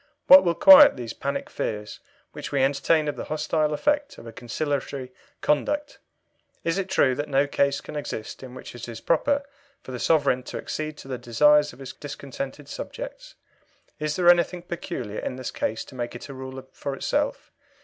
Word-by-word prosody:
What 280 +1 +10
will 170 -1 +1
quiet 285 - +9
these 120 -2 -5
panic 140 +1 -3
fears 105 -1 -4 0.3
which - - -7
we 140 -2 +2
entertain 145 +3 +2
of 145 - -2
the - - -5
hostile 155 0 0
effect 290 - 0
of - - -12
a 115 - -8
conciliatory 135 +1 -4 0.3
conduct? 295 - 0 0.6
Is 165 +3 0
it 190 -1 -3
true 130 -8 +3
that 145 +3 -4
no 140 0 +3
case 140 -1 +1
can 155 - -9
exist 140 -7 -5
in 130 -1 -10
which - - -9
it 120 0 -8
is 115 -1 -7
proper 285 - +1 0.4
for - - -9
the 125 - -5
Sovereign 140 -5 +2
to - - -6
accede 155 -1 -5
to - - -11
the 130 -2 -4
desires 150 +5 +4
of 125 - -16
his 135 -1 -8
discontented 140 0 -7
subjects? - - -8 0.6
Is 150 0 -1
there 180 -1 +1
anything 175 0 +4
peculiar 170 - -5
in - - -4
this 130 -1 -5
case 110 - -3
to - - -14
make 120 -1 -5
it 120 - -9
a - - -6
rule 130 0 -8
for 140 -1 -5
itself? - - -2
145 Hz, 190 wpm, -25 LUFS, 130-165 Hz, 0.6 s, What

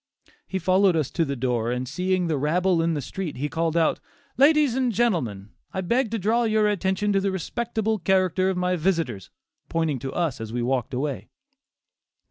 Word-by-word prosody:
He 190 - -2
followed 185 +1 +3
us 155 -4 0
to 170 - +1
the 140 -3 -2
door, 120 -2 -1
and 125 +1 -2
seeing 180 +5 0
the 155 -4 0
rabble 175 +4 +2
in 165 0 +1
the 145 - -3
street 180 -4 -5
he 145 +3 -1
called 165 +1 -1
out, 165 - +2 0.4
"ladies 290 -1 +4
and 255 -1 +1
gentlemen, 130 - -1 0.2
I 190 - 0
beg 235 +6 +1
to 225 - -2
draw 225 +4 +1
your 215 -1 +2
attention 200 0 0
to 195 - +3
the 200 - 0
respectable 220 +4 -2
character 185 +1 +2
of 190 - -1
my 180 0 +1
visitors," 160 - -1 0.4
pointing 160 -5 0
to 135 +3 -5
us 155 -6 -2
as 110 -1 -6
we 120 0 -2
walked 125 0 -1
away. 140 +1 -3
180 Hz, 190 wpm, -24 LUFS, 140-200 Hz, 0.4 s, ladies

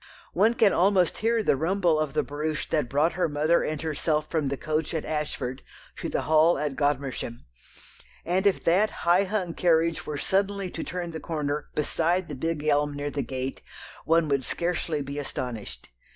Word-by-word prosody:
One 225 +3 +3
can 220 -5 +4
almost 185 -1 +3
hear 225 0 +1
the - - +3
rumble 170 +1 +1
of 155 -3 -1
the - - +1
barouche 150 +2 -3
that 150 -6 +1
brought 150 +5 +2
her 175 -1 0
mother 155 +3 +2
and 155 -1 -2
herself 155 0 0
from 155 -4 0
the 140 0 -2
coach 155 +3 -2
at 160 - -2
Ashford 140 -4 -3 0.4
to - - -4
the - - -1
Hall 160 +2 +4
at 150 -2 -2
Godmersham, 135 -4 -2 0.8
and 185 +4 +2
if 195 - +1
that 195 +6 +4 0.2
high 180 +3 +5
hung 185 -4 -2
carriage 165 -1 +2
were 150 - -3
suddenly 195 +2 0
to 165 - -5
turn 175 -1 -4
the 160 - -5
corner 150 -3 -3
beside 170 +4 0
the 145 - -4
big 155 +2 -2
elm 145 -1 +2
near 145 0 -3
the 140 - -2
gate 130 +1 -4 0.4
one 165 0 +3
would 140 -2 +1
scarcely 170 -3 -1
be 140 +1 -5
astonished. 110 - -6
155 Hz, 180 wpm, -26 LUFS, 145-175 Hz, 0.8 s, high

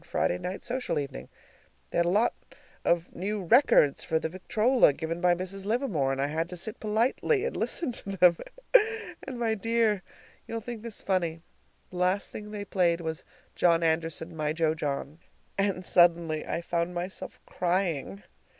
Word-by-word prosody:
Friday 90 - 0
night 185 +2 -5
social 250 +1 -2
evening. 140 -2 -5 0.6
They - - +1
had 170 - +3
a - - +3
lot 215 +6 +3 0.5
of 170 0 +1
new 200 +3 -2
records 180 - +5
for 160 - +1
the 160 - -2
victrola, 215 - +3
given 165 +3 -4
by 180 -1 +4
Mrs. 190 +2 -5
Livermore, 210 - +1
and 135 - -2
I 140 - +2
had 160 +3 -2
to 180 - -7
sit 215 +5 -4
politely 240 - +1
and 485 - -3
listen 325 -7 -1
to 195 -4 -3
them. 180 -1 +6 0.9
And, 260 -2 -7
my 230 -2 +1
dear 220 -2 +1 0.5
you'll 230 - -3
think 230 0 -7
this 230 -2 -8
funny 170 -4 -1 0.5
the 180 - -8
last 180 +2 +1
thing 210 0 -7
they 205 -1 -5
played 175 -4 +2
was 160 0 -4 0.3
"John 170 -1 +3
Anderson, 165 +1 -1
my 155 -1 -1
jo 160 -1 +1
John," 150 0 -4 0.4
and 195 -2 0
suddenly 170 -3 +3
I 170 - -2
found 170 +1 -2
myself 180 +2 -5
crying! 170 - -1
180 Hz, 170 wpm, -28 LUFS, 165-210 Hz, 0.9 s, them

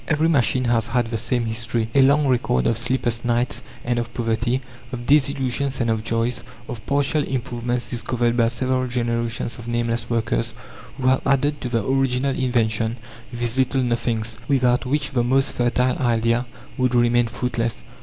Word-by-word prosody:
Every 155 0 +2
machine 130 -4 +2
has 120 -2 +1
had 120 -2 0
the 115 - 0
same 120 +1 0
history 115 0 -2
a 140 - +5
long 140 +2 +4
record 120 - +1
of 115 - +2
sleepless 120 -1 -1
nights 120 +1 0 0.2
and 120 0 +1
of 120 -1 -4
poverty, 120 +2 0 0.3
of 120 -1 -5
disillusions 140 -1 +1
and 115 -2 +1
of 110 -1 -1
joys, 115 +2 -1 0.3
of 115 -3 -7
partial 145 +2 +2
improvements 120 -2 -3
discovered 120 0 0
by 115 -1 +3
several 130 +2 -1
generations 120 0 -2
of 120 - -9
nameless 120 -1 -1
workers, 115 0 -1 0.4
who 130 - -4
have 130 0 +4
added 145 +2 +1
to 125 - -3
the 115 -4 0
original 135 +1 +1
invention 115 -2 0 0.3
these 120 +1 -2
little 130 0 +2
nothings, 115 -2 -1
without 125 -2 +2
which 145 +1 0
the 125 -3 +1
most 135 +2 +2
fertile 125 +1 +1
idea 115 0 +1 0.3
would 125 -1 +2
remain 120 0 +3
fruitless. 120 -1 -2
120 Hz, 165 wpm, -22 LUFS, 115-130 Hz, 0.4 s, a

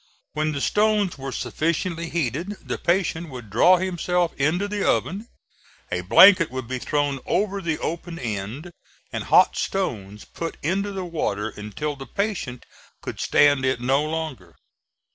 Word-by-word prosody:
When 155 +1 0
the 140 - -3
stones 210 -5 +1
were 135 0 -5
sufficiently 165 +4 -2
heated, 165 - -2
the - - -3
patient 170 -2 0
would 120 -6 -9
draw 180 - +6
himself 180 -1 0
into 160 +8 0
the 205 0 -2
oven; 205 +5 0 0.6
a - - -1
blanket 185 -4 +7
would 130 -2 -5
be 130 +1 -3
thrown 145 0 -1
over 200 -1 0
the 165 -4 -1
open 170 +1 -4
end, 115 - -5 0.4
and - - -3
hot - - +5
stones 105 - -3
put 165 -1 -6
into 195 +6 0
the 190 -2 -4
water 110 - -2
until 105 +9 -5
the 135 -1 -9
patient 200 - -3 0.4
could - - -6
stand 145 -2 +4
it 130 -2 +1
no 135 +4 +2
longer. 155 - -5
160 Hz, 150 wpm, -24 LUFS, 130-185 Hz, 0.6 s, blanket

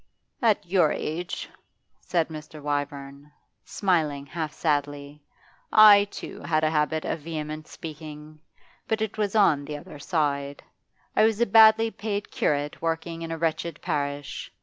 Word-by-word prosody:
'At 215 -4 +2
your 175 -3 +3
age,' 170 +4 -4 0.5
said 170 -3 -1
Mr. 155 0 -9
Wyvern, 145 0 -4 0.3
smiling 155 -8 0
half 155 +2 -4
sadly, 145 -1 -2 0.5
'I, 210 -2 +8
too, 205 - -9
had 155 -1 0
a 155 - +2
habit 155 0 0
of - - -2
vehement 155 0 -6
speaking, 155 -1 -9 0.5
but 220 - 0
it 220 0 -5
was 205 0 -1
on 155 -9 +4
the 150 0 -5
other 145 0 -11
side. 140 -3 -1 0.5
I 215 - +5
was 220 -1 +2
a 235 - +4
badly 225 +1 +6
paid 205 -2 -4
curate 145 0 -1
working 165 0 -3
in 165 0 -5
a 165 - -3
wretched 165 -1 -2
parish. 145 -1 -3
155 Hz, 145 wpm, -26 LUFS, 145-190 Hz, 0.5 s, I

